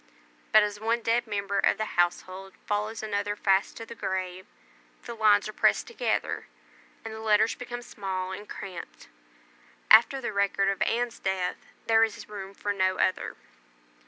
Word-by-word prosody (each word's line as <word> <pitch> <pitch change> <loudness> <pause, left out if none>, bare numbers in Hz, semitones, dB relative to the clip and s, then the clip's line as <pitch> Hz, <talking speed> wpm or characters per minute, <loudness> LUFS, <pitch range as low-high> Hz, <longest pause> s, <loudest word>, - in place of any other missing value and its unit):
But 215 -1 +7
as 205 0 -3
one 230 +2 0
dead 235 +1 +1
member 200 -1 -1
of - - +3
the 215 - -1
household 185 +2 -1
follows 210 +2 -2
another 205 -1 -1
fast 195 -1 +1
to 225 - -7
the 235 - -9
grave, 185 -3 -4 0.6
the 235 - -6
lines 215 -2 +4
are 215 - -7
pressed - - +3
together, 470 +2 -2 0.6
and 225 - -5
the 220 - -7
letters 220 0 +3
become 245 -1 -7
small 190 -4 -4
and 205 +2 -8
cramped. 185 -4 -8 0.8
After 235 +5 +7
the 240 - -4
record 200 0 +2
of 195 - -2
Anne's 240 0 0
death, 190 -2 -2 0.2
there 225 0 +5
is 220 -2 -2
room 200 -2 -8
for 205 +1 -2
no 185 -1 +1
other. 185 - 0
205 Hz, 160 wpm, -27 LUFS, 195-225 Hz, 0.8 s, But